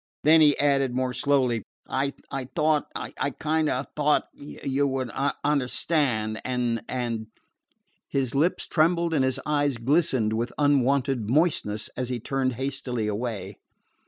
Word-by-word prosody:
Then 160 +2 +7
he 150 -2 +5
added 135 -3 +2
more 130 0 0
slowly: 130 -3 +1 0.3
"I 140 +1 -1 0.4
thought 155 -2 +2
I - - -5
I - - +1
kind 155 +2 0
o' 130 - 0
thought 150 0 +2
you 140 -1 -2
would 130 -3 -2 0.3
understand, 130 -5 0
and 120 -2 -1
and 115 -3 -3 0.4
" - - -46 0.3
His 130 -4 -1
lips 155 +6 +1
trembled 170 +1 +2
and 140 -4 +3
his 130 +1 0
eyes 145 -3 +1
glistened 130 -3 +1
with 115 +2 -2
unwonted 135 -4 +2
moistness 130 -8 +1
as 125 -1 -3
he 125 -1 -2
turned 130 +2 -1
hastily 130 -2 -3
away. 105 0 -3
135 Hz, 140 wpm, -26 LUFS, 120-145 Hz, 0.4 s, Then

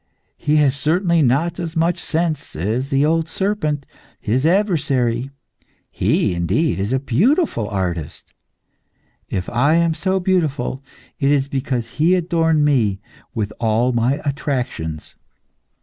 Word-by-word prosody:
He 150 +1 +1
has 145 -3 +3
certainly 170 +3 +2
not 155 +7 +1
as 165 -1 -4
much 165 +1 +1
sense 160 -2 -2
as 110 - -2
the 140 0 +2
old 165 +1 +1
serpent, 165 -7 -1 0.3
His 130 +8 0
adversary. 140 - +1 0.6
He, - - +1
indeed, 90 - 0
is 100 +4 -2
a 130 - +2
wonderful 210 - +2
artist. 90 -6 -4 1.0
If 95 -1 -3
I 140 +7 +2
am 170 -1 +3
so 190 +3 0
beautiful, 155 -8 -1 0.4
it 135 - +2
is 140 -1 +2
because 130 -4 -2
he 170 +4 +4
adorned 165 -3 +2
me 110 -9 +2 0.4
with 105 -3 -2
all 115 +2 +2
my 125 +4 +1
attractions. 125 - -3
140 Hz, 130 wpm, -20 LUFS, 120-165 Hz, 1.0 s, he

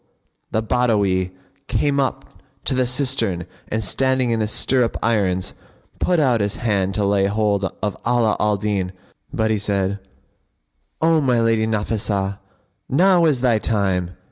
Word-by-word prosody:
the 110 - -1
Badawi 105 -6 +1 0.4
came 140 -1 +1
up 135 - -3 0.2
to - - +1
the 130 -1 +1
cistern 120 - 0 0.2
and, 110 +1 -2
standing 130 +1 +1
in 115 - 0
his 110 -1 -1
stirrup 125 +1 +1
irons 95 -5 0 0.5
put 180 -2 +2
out 125 -7 +2
his 100 0 -1
hand 100 -5 -1
to 105 - 0
lay 100 -1 +2
hold 100 -1 0 0.2
of 105 -2 -1
Ala 120 -2 +2
al 105 -1 +2
Din; 95 -2 -2 0.4
but 110 0 0
he 110 - +1
said, 100 -1 -1 1.0
"O 160 -1 +4
my 125 -4 +2
lady 115 -1 +2
Nafнsah[FN#50]! 105 -2 -1 0.5
Now 175 +4 +4
is 145 -6 +2
thy 120 -4 +3
time!" 95 -5 -1
110 Hz, 145 wpm, -21 LUFS, 100-125 Hz, 1.0 s, O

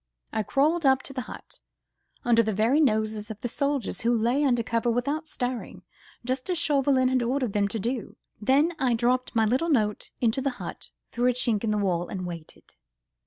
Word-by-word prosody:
I 220 - +1
crawled 305 +9 +1
up 265 -1 +4
to 275 - -8
the 260 - -3
hut, - - -10 0.7
under 235 -1 +5
the 220 -2 -1
very 230 +8 +3
noses 215 -6 +1
of 215 -1 -7
the - - -1
soldiers, 280 +1 -1
who 235 - +2
lay 240 +5 +2
under 245 -4 +2
cover 230 +1 0
without 280 +7 -1
stirring, 245 -4 -4 0.4
just 255 +5 -2
as 360 - +1
Chauvelin 275 -4 +2
had 255 -1 +2
ordered 250 -2 -1
them 205 -1 +2
to 215 - -4
do, 235 +3 -3 0.3
then 275 +9 +3
I 250 -3 +2
dropped 250 +2 0
my 225 -1 +4
little 260 +10 +1
note 215 -8 +1
into 235 +2 +1
the 275 - +1
hut, - - -7 0.2
through 245 +1 +2
a - - +2
chink 235 -3 0
in 225 - 0
the 210 - +1
wall, 175 -4 0
and 185 -3 -5
waited. 170 -3 -9
245 Hz, 200 wpm, -26 LUFS, 220-270 Hz, 0.7 s, under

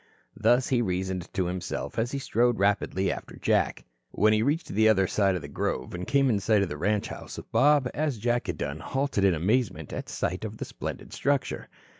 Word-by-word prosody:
Thus 120 +4 +3
he 125 -2 +2
reasoned 95 -3 -2
to 95 -2 +1
himself, 90 +4 -3
as 115 +2 0
he 140 - -2
strode 120 -3 +1
rapidly 100 -1 +1
after - - -7
Jack. - - +1 0.2
When 110 +1 +3
he 110 - +3
reached 145 +8 0
the 110 +2 +4
other 95 -3 +4
side 95 0 +2
of 90 - -4
the - - -6
grove, 65 - -3
and 90 0 -5
came 140 -1 +3
in 110 -5 +2
sight 105 0 +3
of 95 - -3
the 75 - -5
ranch 105 +5 0
house - - -7
Bob, 145 -1 +4
as 150 -4 -1
Jack 120 +3 0
had 85 -4 -3
done, 70 +2 -3
halted 135 -4 -1
in 95 -3 +4
amazement 90 - 0
at - - -5
sight - - -2
of - - -5
the - - -4
splendid - - -7
structure. 140 -1 -1
105 Hz, 210 wpm, -27 LUFS, 95-125 Hz, 0.2 s, the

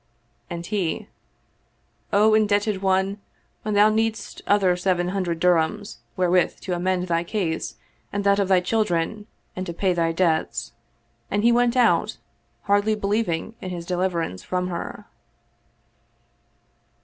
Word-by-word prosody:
And 170 -1 -5
he, 190 -5 -2 0.5
" - - -42
O 215 0 +5
indebted 205 -2 +2
one, 190 +1 +1 0.4
when 215 -1 -2
thou 205 +1 +6
needest 220 0 -1
other 195 -3 +3
seven 180 -1 0
hundred 180 -3 -2
dirhams, 180 +4 +1 0.2
wherewith 180 -1 +2
to 185 - -3
amend 180 +1 0
thy 170 -1 +1
case 175 -3 -2 0.4
and 205 0 -2
that 200 0 +3
of 200 - +1
thy 185 -1 +4
children 210 0 -1 0.3
and 185 - -3
to 170 - -4
pay 185 +2 +1
thy 165 -1 +1
debts." 165 -2 0 0.6
And 205 +1 0
he 235 - +5
went 240 +1 +2
out, 245 -2 +3 0.5
hardly 205 +2 +2
believing 205 -3 -1
in 185 - -5
his 175 -2 -5
deliverance 175 - -1
from 180 0 -2
her. 170 -1 -6
190 Hz, 135 wpm, -24 LUFS, 175-210 Hz, 0.6 s, thou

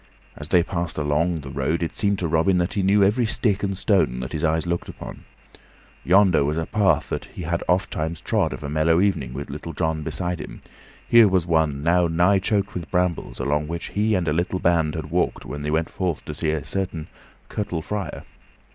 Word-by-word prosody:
As 75 - -9
they 90 -2 +4
passed 85 -2 -3
along 75 +3 0
the 70 -1 -8
road 75 +5 -1
it 80 - -4
seemed 100 -1 +1
to 90 - -1
Robin 85 +4 +2
that 90 +1 0
he 100 - 0
knew 100 +2 +4
every 110 +4 +2
stick 105 -3 0
and 95 -2 -2
stone 95 - +2
that 65 - -5
his 75 - -3
eyes 80 +1 +1
looked 85 0 -2
upon. - - -9 0.8
Yonder 95 -3 +4
was 75 +3 -1
a 80 - -1
path 100 0 +1
that - - -3
he 90 - -9
had 85 +1 -1
ofttimes 85 -3 0
trod - - 0
of - - -7
a - - -3
mellow 80 +3 +2
evening, 90 -11 +1
with 70 +2 -6
Little 75 +3 -6
John 80 0 -1
beside 90 +3 -3
him; - - -9 0.5
here 115 -2 +7
was 95 -3 +1
one, 80 -4 +1
now 85 +1 +3
nigh 90 +4 +3
choked 100 +1 0
with 90 -2 -6
brambles, 90 -2 -1
along 75 +2 0
which 85 +1 -5
he 105 +1 +1
and 90 -3 -1
a 75 - +2
little 85 +3 0
band 85 -4 +1
had 75 -1 -5
walked 90 +1 0
when 75 - -6
they 75 - -3
went 80 +2 +1
forth 90 -5 -2
to - - -5
seek 80 -1 -1
a 80 - -2
certain 90 -5 -3 0.4
curtal 100 -6 -3
friar. 105 +1 -4
85 Hz, 215 wpm, -23 LUFS, 80-95 Hz, 0.8 s, here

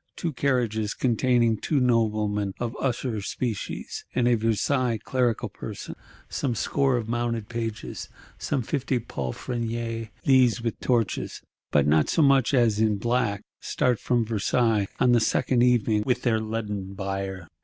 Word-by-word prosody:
Two 165 -3 -3
carriages 120 -6 0
containing 120 -2 +2
two 145 +7 0
noblemen 105 -5 +1
of 120 -1 -2
the - - -11
usher 120 -4 -1
species, 110 +2 -4
and 125 -1 +2
a 120 - +4
Versailles 115 +2 +1
clerical 120 +1 0
person; - - -7 0.3
some 130 -5 -2
score 135 +3 +1
of 115 -2 -3
mounted 115 -2 -2
pages, 115 -2 -5 0.3
some 135 -4 -1
fifty 135 0 -1
palfreniers; 115 - -4 0.2
these, 130 -3 +4
with 115 -1 -3
torches, 115 -6 -1 0.3
but 70 -2 +3
not 75 +1 +3
so 160 - +3
much 135 -3 +4
as 120 -6 +3
in 110 -2 +2
black, 110 -2 0 0.2
start 125 -3 0
from 120 -2 +1
Versailles 110 -1 +1
on 125 - +4
the 120 - +5
second 120 +2 +2
evening 120 -3 +3
with 125 +1 0
their 115 -3 +2
leaden 105 -3 -4
bier. 95 -2 -4
115 Hz, 145 wpm, -26 LUFS, 105-125 Hz, 0.3 s, the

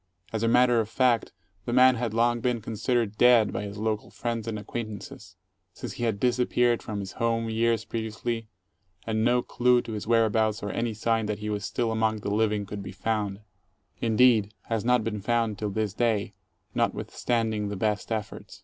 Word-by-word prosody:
As 110 - -1
a 115 - +2
matter 125 0 +4
of 110 -1 -1
fact, 120 -2 +2 0.3
the 120 - -2
man 130 +1 +7
had 120 -2 -2
long 120 +1 +2
been 120 0 0
considered 110 0 -1
dead 120 -3 +5
by - - -2
his 100 0 -6
Jocal 110 0 -2
friends 115 -2 -3
and 110 -1 -2
acquaintances; 105 -3 -7 0.4
since - - -7
he 120 - -3
had 110 -3 -1
disappeared 120 -1 +2
from 105 -3 -4
his 95 -1 -6
home 115 -1 -1
years 115 0 +1
previously 115 0 -3 0.6
and 110 -1 0
no 120 +1 +3
clue 125 0 +3
to - - -7
his 105 -1 -5
whereabouts 110 -2 +2
or 105 - -2
any 115 -2 -2
sign 115 0 0
that 105 -1 -2
he 105 0 -4
was 105 -1 -3
still 115 0 -1
among 110 -1 0
the 100 - -2
living 105 -1 +1
could 100 0 -6
be 95 -1 -7
found; 105 0 -2 0.6
indeed, 110 -2 +3
has 115 -2 -2
not 125 -1 +3
been 105 -2 -3
found 115 -1 0
till 105 - -2
this 105 -1 -2
day, 110 -3 0 0.4
notwithstanding 110 -3 -1
the 100 - -4
best 105 +2 -1
efforts. 110 -2 -5
110 Hz, 185 wpm, -27 LUFS, 105-120 Hz, 0.6 s, man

